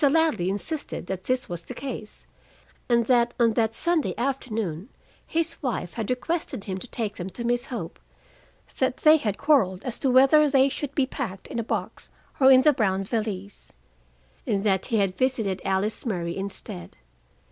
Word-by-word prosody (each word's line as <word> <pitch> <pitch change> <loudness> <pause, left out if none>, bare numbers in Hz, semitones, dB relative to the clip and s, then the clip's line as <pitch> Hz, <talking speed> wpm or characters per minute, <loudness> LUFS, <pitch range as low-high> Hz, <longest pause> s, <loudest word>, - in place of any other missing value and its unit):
Ladley 310 - +2
insisted 245 - -4
that 185 0 -5
this 255 0 0
was 175 -1 -5
the 250 - -9
case, 235 -6 -7 0.6
and 235 -1 +3
that 240 -1 +3
on 230 -2 +4
that 225 0 +1
Sunday 340 +1 +1
afternoon 225 - -2 0.4
his 330 0 -2
wife 240 - -3
had 225 -3 -4
requested 255 - -2
him 190 -2 -4
to - - -7
take 215 -3 -4
them 180 +2 -5
to 235 - -7
Miss 240 +1 0
Hope; 205 -10 -6 0.8
that 260 -1 +1
they 310 +1 +6
had 210 -8 -2
quarreled 200 -12 +2
as 245 -3 -4
to 270 - +1
whether 275 +4 +6
they 270 0 +4
should 285 0 -5
be 275 - +3
packed 190 -7 -5
in - - -4
a - - -1
box - - -4 0.3
or 265 -1 +7
in 260 0 +7
the 300 - +6
brown 195 -6 +1
valise, 205 -2 -4 0.7
and 200 -4 0
that 190 -3 +1
he 230 - +1
had 195 -3 +1
visited 220 -6 0
Alice 195 +3 0
Murray 175 -7 -2
instead. 190 - -6
230 Hz, 175 wpm, -25 LUFS, 195-265 Hz, 0.8 s, or